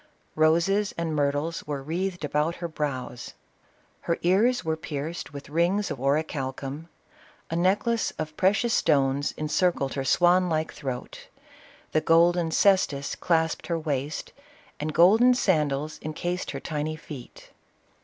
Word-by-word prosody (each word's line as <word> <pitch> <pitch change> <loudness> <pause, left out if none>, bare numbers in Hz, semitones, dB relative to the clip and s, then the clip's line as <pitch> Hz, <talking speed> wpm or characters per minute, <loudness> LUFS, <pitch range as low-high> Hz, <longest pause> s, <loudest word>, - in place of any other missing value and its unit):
Roses 170 +6 +2
and 165 -2 -2
myrtles 145 +3 -1
were 145 -2 -4
wreathed 175 +2 -3
about 150 +3 0
her 170 - -4
brows; 135 -6 -5 0.6
her 170 - -1
ears 210 +8 +3
were 160 0 0
pierced 155 +1 -5
with 140 -1 -9
rings 175 +5 +1
of 140 - -5
orichalcum; 140 +1 -2 0.6
a - - -1
necklace 205 +6 +1
of 155 0 -5
precious 205 +6 +2
stones 140 -1 +2
encircled 155 -2 0
her 135 - -2
swan 175 +5 +4
like 155 -1 -1
throat; 130 -4 -6 0.6
the 155 - +2
golden 170 +1 +4
cestus 160 -6 +2
clasped 160 -2 0
her 170 - 0
waist, 145 -2 -3 0.5
and 150 +1 -2
golden 220 +10 +6
sandals 150 - 0
in 155 - -5
cased 175 +3 -3
her - - -4
tiny 155 0 -3
feet. 145 -5 -11
160 Hz, 135 wpm, -26 LUFS, 145-175 Hz, 0.6 s, golden